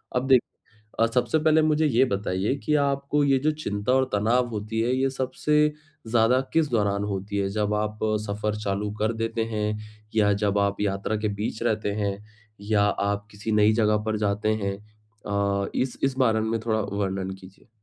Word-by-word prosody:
अब 125 +1 0
देख 130 -3 +6 0.6
अ, 115 - +5
सबसे 120 +4 +1
पहले 155 0 +4
मुझे 155 0 +2
ये 130 -1 +4
बताइए 100 +1 -1
कि 150 - +1
आपको 140 +1 0
ये 135 -1 +3
जो 155 - +4
चिंता 115 -6 -2
और 130 0 +4
तनाव 120 +4 +2
होती 110 0 -3
है, 120 +3 +1
ये 135 0 +1
सबसे 150 +3 +1 0.3
ज़्यादा 115 +3 +3
किस 160 -3 +2
दौरान 100 -3 +1
होती 100 0 -4
है? 100 -1 0
जब 105 0 0
आप 105 0 -2 0.3
सफर 105 +1 -2
चालू 100 0 -2
कर 110 +2 +1
देते 115 0 -2
हैं? 105 0 -1 0.4
या 105 -2 +4
जब 100 0 +2
आप 100 0 0
यात्रा 100 +1 -1
के 105 0 -1
बीच 110 +1 -3
रहते 110 -3 0
हैं? 100 -1 -1 0.4
या 105 0 +1
आप 100 0 -1
किसी 105 +1 -5
नई 105 0 +5
जगह 105 -1 +3
पर 110 0 0
जाते 105 +2 0
हैं? 100 0 -1 0.5
अ, 100 -1 0
इस 130 -1 -1
इस 135 -1 +1
बारे 110 -4 +3
में 110 +1 -1
थोड़ा 110 -1 +1
वर्णन 95 -2 -2
कीजिए। 95 +1 -16
110 Hz, 185 wpm, -25 LUFS, 100-125 Hz, 0.6 s, देख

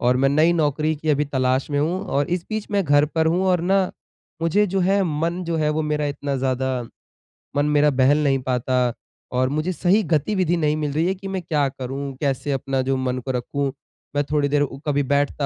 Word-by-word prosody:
और 125 +1 +3
मैं 135 +1 +3
नई 155 +4 +4
नौकरी 155 -1 +1
की 155 +1 -6
अभी 150 0 +2
तलाश 130 -1 0
में 145 - 0
हूँ 170 +5 0
और 140 +1 0
इस 175 -1 -1
बीच 215 -1 -3
मैं 200 -2 +1
घर 145 -1 +4
पर 160 0 +2
हूँ 175 +3 +2
और 180 -2 +3
ना 190 +2 +2 0.6
मुझे 200 +6 +3
जो 195 0 -1
है, 195 +2 +3
मन 170 +2 -1
जो 165 -1 -1
है, 155 -1 +1
वो 155 +1 0
मेरा 150 -1 -1
इतना 140 -1 -3
ज़्यादा 130 -1 -1 0.7
मन 145 +1 +2
मेरा 150 0 +4
बहल 140 +3 +3
नहीं 135 -2 +2
पाता 125 -1 0 0.4
और 130 +1 +2
मुझे 155 +5 -1
सही 190 +5 +3
गतिविधि 175 +2 +1
नहीं 150 -2 +1
मिल 150 -2 -2
रही 160 +3 +1
है 190 - +1
कि 195 +1 -8
मैं 190 -1 -3
क्या 150 -4 0
करूँ? 135 +1 -5
कैसे 140 0 -1
अपना 135 -1 -1
जो 135 +1 0
मन 130 -1 -1
को 130 +1 -4
रखूँ? 135 +3 -2 0.4
मैं 145 - +2
थोड़ी 145 -1 +2
देर 145 0 +2
उ 140 -1 -2
कभी 145 -1 +2
बैठता 140 +1 0
145 Hz, 220 wpm, -22 LUFS, 135-165 Hz, 0.7 s, नई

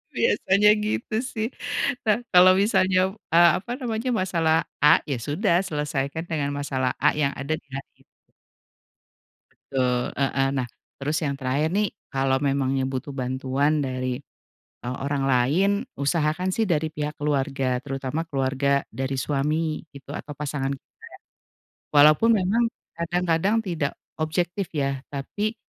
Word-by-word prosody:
Biasanya 210 - +3 0.2
gitu, 215 +1 -2
sih. 225 -3 -3 0.6
Nah, 215 -1 +4 0.2
kalau 180 +1 +8
misalnya, 190 -2 +3 0.2
eee, 170 +1 +8
apa 235 +6 -9
namanya, 230 0 -2
masalah 170 -6 +1 0.3
A, 150 - +7
ya 135 - 0
sudah, 170 - +1
selesaikan 150 0 -2
dengan 145 -3 -1
masalah 130 -3 -1
A, - - +5
yang 140 -2 +1
ada 140 +3 -3
di - - -17
hari 135 0 -5 0.2
ini. - - -46 1.7
Betul. 125 -2 +1
Heeh, 135 0 +1
nah, 130 -2 -1 0.3
terus 150 +3 -1
yang 140 -2 -1
terakhir 140 +4 0
nih, 205 +2 +2 0.2
kalau 135 0 +1
memangnya 135 -1 +1
butuh 135 +1 -4
bantuan, 135 +3 0
dari, 130 -2 -2 0.6
eee, 125 +1 -4
orang 140 -1 -1
lain, 135 +10 +3 0.3
usahakan 155 +5 +1
sih 220 +4 +1
dari 160 -4 0
pihak 150 0 -4
keluarga. 135 -3 0
Terutama 135 +3 -3
keluarga 140 -1 +1
dari 135 +1 -3
suami, 150 +3 -1
gitu, 140 0 -11
atau 150 - -7
pasangan 140 -2 -3
Kakak. 135 - -12 1.1
Walaupun 155 +9 +6
memang, 200 +5 +2 0.3
kadang-kadang 170 +3 0
tidak 160 -6 -1 0.3
objektif 175 +4 -1
ya, 140 -2 0
tapi, 205 +11 -3
150 Hz, 135 wpm, -24 LUFS, 135-175 Hz, 1.7 s, kalau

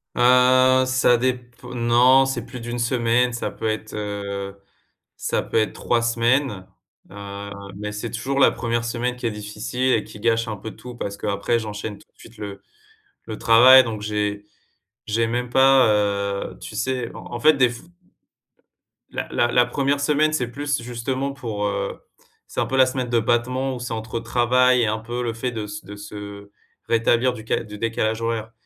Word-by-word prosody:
Heu, 130 +1 +5
ça 130 -1 +3
dép 125 -1 -3
non, 125 +2 +4
c'est 130 -3 -3
plus 125 +1 -9
d'une 120 +1 -5
semaine, 120 0 +1
ça 120 - -3
peut 110 - -4
être, 110 0 -4
heu, 100 -1 -5 0.6
ça - - -1
peut - - -5
être 110 -1 +2
3 120 -1 0
semaines, 115 -3 +1 0.4
heu, 100 0 -8 0.3
mais 105 0 -5
c'est 105 +2 -5
toujours 135 +4 -3
la - - +6
1re 115 0 -2
semaine 125 +1 -2
qui 125 - -4
est - - +1
difficile 105 +5 -2
et 110 - 0
qui 105 - -12
gâche 115 0 +1
un 110 -2 -4
peu 110 +3 -8
tout. 125 -1 -10
Parce 100 -3 -5
qu'après 100 +3 -1
j'enchaîne 105 -1 -6
tout - - -21
de - - -39
suite 115 - -15
le 100 -2 -8 0.6
le 110 - -6
travail, 130 +3 +8
donc 110 -3 -5
j'ai 105 -1 -2 0.6
j'ai 115 +1 +1
même 120 +1 -2
pas, 135 0 +5
heu, 100 -1 -1
tu 105 - -9
sais 125 0 -2
en - - -10
en - - -7
fait 155 0 +6
déf 125 -3 +1 1.3
La - - -4
la 120 - +2
la 125 -1 +5
1re 140 +3 0
semaine, 150 +1 +2
c'est 125 -6 0
plus 145 0 -2
justement 130 +3 -3
pour, 110 -6 -4
heu, 100 - -2 0.5
c'est - - -5
un - - +2
peu 135 - -3
la 130 -1 +6
semaine 130 -1 -3
de 120 -1 +2
battement 125 +3 0
où - - -7
c'est 120 -1 -5
entre 110 +1 -4
travail 125 +2 +3
et 115 - +2
un 110 +1 0
peu 120 +2 -4
le 115 - -2
fait 120 +2 -3
de 110 -2 -4
s 105 -1 -8
de 105 +1 -9
se 100 0 -9 0.4
rétablir 120 +2 +3
du 110 -3 -9
ca - - 0
du 105 -1 -10
décalage 115 0 -1
horaire, 115 -1 -2
115 Hz, 190 wpm, -22 LUFS, 105-125 Hz, 1.3 s, travail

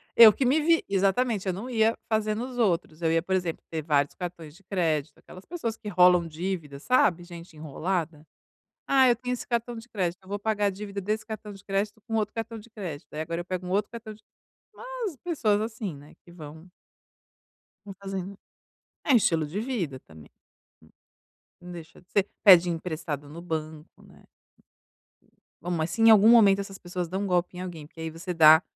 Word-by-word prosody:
Eu 225 -2 +10
que 265 - -1
me 280 +5 +3
vi 330 +2 +3
exatamente, 200 +2 +1
eu 185 - +1
não 215 +8 -6
ia 225 -2 +2
fazer 215 -1 +1
nos 245 +3 -5
outros, 175 -7 0
eu 160 - +2
ia, 165 0 +2
por 190 +3 -1
exemplo, 175 -3 -2
ter 160 -1 -3
vários 145 -2 +1
cartões 170 -4 -7
de 195 - -20
crédito, 160 -6 -1
aquelas 185 +1 -14
pessoas 235 -11 -4
que 210 - -11
enrolam 180 -2 +5
dívidas, 160 -4 -5
sabe, 195 -9 +3
gente 170 -1 -11
enrolada? 160 +1 -3 0.6
"Ah, 265 -1 +5
eu 240 - +5
tenho 250 +2 -4
esse 250 - -6
cartão 235 0 -2
de 225 +2 -10
crédito, 185 -4 -2
eu 185 - -17
vou 205 - -3
pagar 210 -1 0
a - - +4
dívida 200 +1 -6
desse 215 +3 -2
cartão 215 -1 -7
de 195 - -14
crédito 205 +2 -2
com 225 - -2
outro 210 -2 -1
cartão 225 0 -5
de 220 +2 -13
crédito, 170 -10 -8
aí 155 - -3
agora 165 +2 -3
eu 175 - -10
pego 185 0 -4
um - - -5
outro 200 +2 0
cartão 225 -2 -8
de" 210 - -19 0.5
umas 485 - -5
pessoas 225 -12 +1
assim, 220 -5 -4
né, 145 +2 -15
que - - -17
vão 160 0 -11 1.2
vão 195 -2 -9
fazendo. 195 0 -5 0.7
É 285 - +4
estilo 165 -8 +3
de 180 +8 -4
vida 200 - -3
também. 80 -2 -16 1.3
Não 180 0 -10
deixa 170 -1 -11
de 180 - -30
ser. 200 -1 +1
Pede 180 -4 +8
emprestado 160 -3 -4
no 165 +3 -9
banco, 155 -2 -6
né. - - -19 1.4
Bom, 175 - -4
mas 165 -1 -1
se 225 - -3
em 225 - +8
algum 215 0 +7
momento 205 -4 +7
essas 195 -1 -6
pessoas 180 -1 -5
dão 190 +2 -2
golpe 180 -1 0
em - - -5
alguém, 170 -5 -7
porque 165 - -13
aí 160 - -3
você 170 +3 -5
dá 160 -1 +8
190 Hz, 200 wpm, -27 LUFS, 165-220 Hz, 1.4 s, Eu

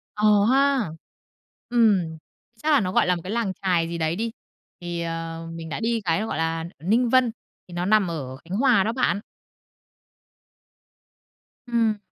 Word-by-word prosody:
Ờ 210 -1 +4
ha. 275 - +3 0.8
Ừm, 205 -9 +3 0.5
chắc 310 - +2
là 290 - +6
nó 185 -2 -1
gọi - - +3
là 180 - +3
một 170 - -6
cái 185 - -5
làng 225 -4 -1
chài 180 -4 +2
gì 170 0 -4
đấy 160 0 0
đi, 225 +4 -2 0.5
thì, 175 -1 -4
ờ, 165 0 -4
mình 165 -1 -7
đã - - -4
đi 230 0 0
cái 165 +1 +2
nó 220 - -2
gọi 155 - -3
là 165 0 -1 0.2
ở 155 - -13
Ninh 235 +5 +3
Vân, 255 -1 +4 0.4
thì 180 - -12
nó 175 +1 -2
nằm 210 -1 +4
ở 130 -5 -5
Khánh 175 +7 -5
Hòa 245 -5 +4
đó 220 - 0
bạn. 250 -5 +1 2.5
Ừm. 230 -3 +1
195 Hz, 180 wpm, -24 LUFS, 165-230 Hz, 2.5 s, là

